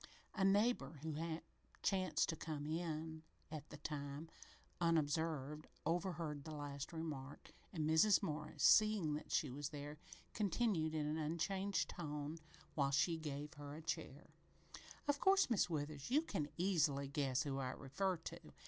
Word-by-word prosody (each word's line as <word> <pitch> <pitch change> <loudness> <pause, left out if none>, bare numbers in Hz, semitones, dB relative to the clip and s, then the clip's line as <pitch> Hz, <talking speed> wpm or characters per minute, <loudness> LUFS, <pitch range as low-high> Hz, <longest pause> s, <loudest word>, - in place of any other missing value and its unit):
A 190 - 0
neighbor 200 -3 +3
who 160 -2 -2 0.7
chanced 185 -2 +2
to 165 - 0
come 155 -2 -4
in 160 0 -2 0.3
at 155 -1 -6
the - - -8
time, 145 +1 -4 0.5
unobserved 155 -2 +1 0.2
overheard 165 -3 -1
the 155 0 -6
last 145 -1 -4
remark, 150 -4 -5 0.2
and 155 -4 -1
Mrs. 160 +6 +6
Morris, 150 0 -3
seeing 215 -8 +6
that 150 - -5
she 145 - +2
was 145 +2 -3
there, 150 0 -6 0.3
continued 195 -6 +1
in 150 -1 +1
an 150 +1 0
unchanged 190 +6 0
tone, 150 -1 -4 0.3
while 140 -2 +2
she 145 +5 +3
gave 150 -1 -4
her 145 -1 -7
a 160 - -7
chair: 155 -3 -4 0.8
"Of 290 0 +2
course, 385 -7 +5
Mis' 200 -5 +3
Withers, 150 -1 -3
you 295 +5 +4
can 155 - -2
easy 155 -7 +2
guess 135 -1 +1
who 135 -2 -2
I 130 -1 -1
refer 175 +9 -1
to. 160 - -7
155 Hz, 150 wpm, -40 LUFS, 145-175 Hz, 0.8 s, Mrs